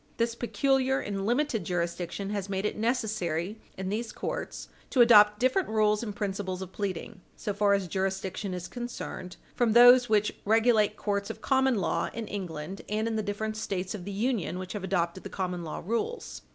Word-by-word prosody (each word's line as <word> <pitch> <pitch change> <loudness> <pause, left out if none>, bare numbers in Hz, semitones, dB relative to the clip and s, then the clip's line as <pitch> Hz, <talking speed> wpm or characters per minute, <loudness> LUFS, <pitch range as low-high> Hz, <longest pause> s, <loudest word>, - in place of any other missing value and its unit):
This 230 0 +1
peculiar 265 +2 +1
and 195 -1 -3
limited 245 -3 +1
jurisdiction 175 +3 -3
has 200 -2 -3
made 195 +1 -1
it - - -1
necessary, 215 -5 -1 0.2
in 190 0 -3
these 220 +3 -2
courts, - - -5 0.2
to 255 - +4
adopt 210 -3 +7
different 260 +9 +2
rules 215 -1 +2
and 210 -4 -5
principles 195 -3 -3
of 190 - -10
pleading, 195 0 -4
so 210 - -3
far 200 0 +3
as 195 -2 -2
jurisdiction 190 +1 -2
is 180 0 -5
concerned, 240 -7 -6 0.2
from 235 -3 +2
those 245 +1 +8
which 210 -1 +2
regulate 220 0 +3
courts 200 -1 -1
of - - -7
common 265 -1 +3
law 190 -6 0
in 230 -2 -4
England 180 -3 -5
and 215 +2 0
in 225 - -1
the 220 - +1
different 215 +1 -3
States 195 -4 -3
of 200 -4 -6
the 200 - -5
Union 210 -3 -1
which 185 -1 -6
have 205 -3 -5
adopted 175 -1 -1
the - - -6
common 180 -2 -3
law 155 - -6
rules. 325 - -3
205 Hz, 185 wpm, -28 LUFS, 190-230 Hz, 0.2 s, those